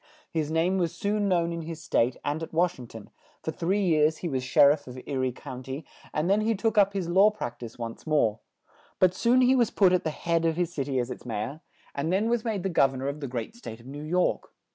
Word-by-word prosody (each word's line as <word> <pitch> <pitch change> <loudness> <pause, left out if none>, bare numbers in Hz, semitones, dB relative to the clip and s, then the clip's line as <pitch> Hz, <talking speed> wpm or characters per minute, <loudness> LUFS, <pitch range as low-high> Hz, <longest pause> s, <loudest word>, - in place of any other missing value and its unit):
His 155 -2 -1
name 170 +4 +1
was 170 -3 -1
soon 205 0 0
known 170 -2 +1
in 170 - -4
his 160 0 -7
state 120 -5 +1
and 150 +2 -1
at 160 - -6
Wash 175 -1 +1
ing 125 - -8
ton; 115 -2 -11 0.3
for - - -2
three 195 +4 0
years 155 -2 +3
he - - +1
was 135 -5 -1
Sher 140 +2 +6
iff 145 -2 -3
of 125 0 -8
E 130 +2 -6
rie 130 -1 0
Coun 125 +1 -8
ty 135 +4 -6 0.3
and 150 +2 -1
then 200 +3 +3
he 225 +1 +1
took 220 +3 0
up 200 -1 +4
his 190 -4 -2
law 190 +4 +6
prac 210 - -6
tise 115 -2 -9
once 115 +5 -7
more; 145 -9 +2 0.6
but 185 -1 +4
soon 245 +6 +3
he 255 +1 +5
was 240 -4 +3
put 190 -3 +4
at 180 - +2
the 160 - 0
head 165 +2 -1
of 165 -1 +1
his 175 -1 -1
cit 140 -2 -2
y 135 - -2
as 125 0 -1
its - - -7
May 110 -4 -3
or; 145 +6 -7 0.3
and 145 +4 -2
then 210 +5 +1
was 240 -2 +1
made 215 -6 -2
the 195 - 0
Gov 135 -5 +3
ern 130 - -5
or 140 - 0
of 145 +1 -5
the 140 - -4
great 125 - -5
state 115 - -9
of 115 - -16
New 140 +3 -8
York. 180 +4 0
160 Hz, 275 wpm, -27 LUFS, 135-190 Hz, 0.6 s, Sher